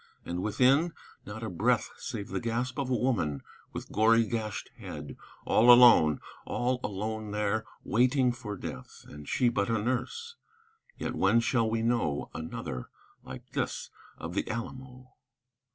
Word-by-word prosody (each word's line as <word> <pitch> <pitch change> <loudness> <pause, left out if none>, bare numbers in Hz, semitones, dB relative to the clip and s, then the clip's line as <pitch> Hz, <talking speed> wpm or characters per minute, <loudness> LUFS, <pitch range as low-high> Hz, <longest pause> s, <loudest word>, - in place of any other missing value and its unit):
And 90 +1 -3
within? 135 - +3 0.3
Not 105 +2 -7
a 110 - -3
breath 85 - +1
Save 100 - -5
the - - -2
gasp 120 +3 -2
of 135 -2 -1
a 130 - +2
woman, 95 - 0 0.3
with - - -7
gory 115 +2 +4
gashed 110 -2 -4
head, - - -7 0.3
All 120 +3 +6
alone, 120 - +7 0.2
all 125 +1 -1
alone 110 +2 -3
there, 105 +1 -1 0.2
waiting 125 +2 +3
for 115 -5 -6
death; - - -8
And 75 0 -10
she 125 - +2
but 100 -3 +1
a 115 - +2
nurse. 130 - -3 0.6
Yet - - -3
when 105 +5 +3
shall 115 -1 +1
we 115 0 0
know 115 -12 0
Another 80 -5 -5 0.3
like - - -10
this - - -3 0.3
of 80 +2 -6
the - - -2
Alamo? 130 +2 -7
115 Hz, 150 wpm, -29 LUFS, 105-125 Hz, 0.6 s, alone